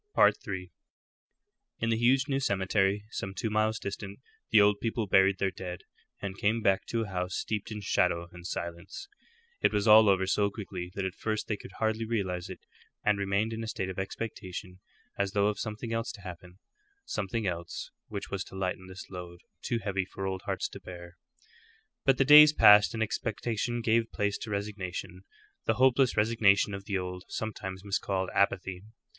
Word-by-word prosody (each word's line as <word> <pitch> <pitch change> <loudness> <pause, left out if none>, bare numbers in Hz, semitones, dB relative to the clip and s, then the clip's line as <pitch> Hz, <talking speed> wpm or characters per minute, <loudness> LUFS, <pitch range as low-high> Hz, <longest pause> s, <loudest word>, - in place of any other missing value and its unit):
III. 95 -3 +2 1.1
In 115 0 0
the - - +3
huge 130 +5 +3
new 135 -2 0
cemetery, 100 -3 +1
some 95 -3 -5
two 110 0 -2
miles 110 +1 +1
distant, 100 0 -6 0.3
the 110 - +6
old 100 0 +4
people 115 -1 -1
buried 95 0 +4
their 95 0 0
dead, 90 0 -7 0.4
and 100 0 -6
came 110 +3 +2
back 95 -2 +2
to 115 -1 -1
a 105 - -7
house 90 -1 -3
steeped 105 -2 -3
in 105 -1 -5
shadow 85 -3 +1
and 90 0 -9
silence. 85 - -6 0.5
It - - +4
was 105 0 0
all 110 0 +8
over 95 -1 +3
so 100 +1 +2
quickly 95 -4 -7
that 100 - -2
at 95 - -3
first 110 +1 -3
they 105 - 0
could 95 - -12
hardly 110 0 -1
realize 95 -5 -2
it, 95 - -8 0.4
and 105 -1 +3
remained 100 +3 0
in 115 0 -4
a - - -5
state 95 -3 -3
of 95 - -6
expectation 95 -2 -6 0.4
as 100 -1 0
though 100 -1 +3
of 105 - -4
something 110 +1 -4
else 115 0 -2
to 105 - -12
happen 90 0 -10 0.5
something 110 +1 -2
else 85 -2 -4 0.2
which 100 -2 -6
was 100 -2 -2
to - - -12
lighten 95 -1 -3
this 95 +1 -9
load, 90 -2 -8 0.2
too 120 - -1
heavy 100 -3 -2
for 95 +1 -6
old 95 -1 -3
hearts - - -1
to - - -10
bear. 85 -1 -10 0.9
But 135 -2 +4
the 135 - +3
days 150 +1 +10
passed, 105 -3 +7
and 110 - +1
expectation 120 +2 -2
gave 115 0 +2
place 100 -1 -1
to 110 - -6
resignation 100 -3 -5 0.4
the - - +2
hopeless 130 0 +3
resignation 105 -2 +3
of 100 0 -6
the 100 -1 -1
old, 90 0 -5
sometimes 95 -3 -5
miscalled, 95 -2 -1
apathy. 95 -2 +1
100 Hz, 185 wpm, -29 LUFS, 95-110 Hz, 1.1 s, days